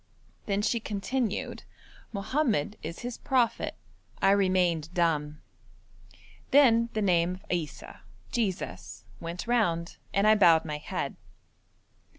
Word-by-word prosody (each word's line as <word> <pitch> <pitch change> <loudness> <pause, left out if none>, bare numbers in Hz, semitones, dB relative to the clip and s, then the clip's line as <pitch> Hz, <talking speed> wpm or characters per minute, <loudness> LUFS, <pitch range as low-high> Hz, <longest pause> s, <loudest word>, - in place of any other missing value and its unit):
Then 200 0 0
she 235 +2 +1
continued, 215 +2 -2 0.5
'Mohammed 215 - 0
is 165 +2 -6
his 245 -1 -5
prophet.' 250 -3 +1 0.4
I 195 - +4
remained 180 -5 +2
dumb. 150 -3 0 1.1
Then 235 -5 +5
the 215 - 0
name 180 -1 +2
of 185 - -16
Issa 155 -5 -4 0.3
(Jesus) 200 -6 -3
went 170 +1 -5
round, 175 -8 0
and 200 +1 +2
I 215 - +7
bowed 170 -7 +5
my 150 -1 -4
head. - - -4
195 Hz, 115 wpm, -28 LUFS, 170-225 Hz, 1.1 s, I